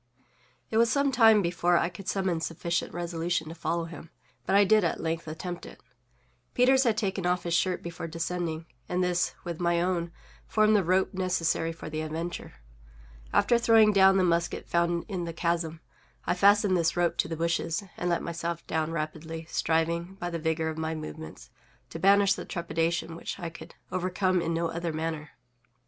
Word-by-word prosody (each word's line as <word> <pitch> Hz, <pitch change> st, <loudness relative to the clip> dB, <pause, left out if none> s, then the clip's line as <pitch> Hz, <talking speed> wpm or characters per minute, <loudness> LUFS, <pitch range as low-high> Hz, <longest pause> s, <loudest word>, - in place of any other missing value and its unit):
It 220 Hz, -, +1 dB
was 230 Hz, 0 st, +4 dB
some 280 Hz, -1 st, +2 dB
time 225 Hz, -4 st, +6 dB
before 175 Hz, 0 st, +2 dB
I -, -, +2 dB
could 180 Hz, +2 st, -11 dB
summon 190 Hz, -4 st, 0 dB
sufficient 170 Hz, +1 st, -2 dB
resolution 170 Hz, -1 st, -2 dB
to -, -, -6 dB
follow 170 Hz, 0 st, -2 dB
him; 165 Hz, -1 st, -10 dB, 0.4 s
but -, -, +2 dB
I 200 Hz, -, +7 dB
did 215 Hz, +1 st, +4 dB
at 170 Hz, -, 0 dB
length 165 Hz, 0 st, -3 dB
attempt 175 Hz, +3 st, -6 dB
it. -, -, -13 dB, 0.8 s
Peters 260 Hz, +2 st, +4 dB
had 225 Hz, -3 st, +2 dB
taken 190 Hz, -3 st, -1 dB
off 180 Hz, 0 st, +1 dB
his 170 Hz, -, -2 dB
shirt 180 Hz, +2 st, +1 dB
before 170 Hz, -1 st, -6 dB
descending, 165 Hz, 0 st, -3 dB, 0.2 s
and 180 Hz, +1 st, +1 dB
this, 180 Hz, -1 st, 0 dB
with 170 Hz, -2 st, -5 dB
my 170 Hz, -1 st, +2 dB
own, 175 Hz, -1 st, -1 dB, 0.4 s
formed 215 Hz, 0 st, +3 dB
the 200 Hz, -, +4 dB
rope 185 Hz, +3 st, +1 dB
necessary 175 Hz, -3 st, 0 dB
for 165 Hz, -, -9 dB
the 155 Hz, 0 st, -3 dB
adventure. 165 Hz, +3 st, -5 dB, 0.8 s
After 240 Hz, -1 st, +3 dB
throwing 225 Hz, -2 st, +5 dB
down 190 Hz, -1 st, +6 dB
the 190 Hz, -, +3 dB
musket 170 Hz, -1 st, 0 dB
found 170 Hz, 0 st, +1 dB
in 185 Hz, -4 st, -3 dB
the 165 Hz, -, -5 dB
chasm, 165 Hz, -1 st, -1 dB, 0.4 s
I 175 Hz, -, +2 dB
fastened 200 Hz, +1 st, +4 dB
this 170 Hz, -1 st, +1 dB
rope 175 Hz, -1 st, +2 dB
to -, -, +1 dB
the 165 Hz, -1 st, -4 dB
bushes, 165 Hz, +3 st, -1 dB
and 175 Hz, -, -2 dB
let 170 Hz, -, 0 dB
myself 170 Hz, 0 st, -4 dB
down 160 Hz, 0 st, -1 dB
rapidly, 160 Hz, +1 st, -5 dB
striving, 170 Hz, +3 st, 0 dB
by 175 Hz, -2 st, -5 dB
the 170 Hz, -, -3 dB
vigor 160 Hz, 0 st, 0 dB
of 160 Hz, 0 st, -5 dB
my 160 Hz, 0 st, -2 dB
movements, 155 Hz, 0 st, -8 dB, 0.4 s
to 165 Hz, -, -6 dB
banish 200 Hz, +2 st, +5 dB
the -, -, -6 dB
trepidation 170 Hz, -1 st, -2 dB
which -, -, -6 dB
I 170 Hz, -2 st, -5 dB
could -, -, -12 dB, 0.2 s
overcome 185 Hz, 0 st, 0 dB
in 165 Hz, -, -1 dB
no 165 Hz, 0 st, 0 dB
other 170 Hz, 0 st, -3 dB
manner. 155 Hz, -1 st, -4 dB
170 Hz, 185 wpm, -28 LUFS, 165-185 Hz, 0.8 s, I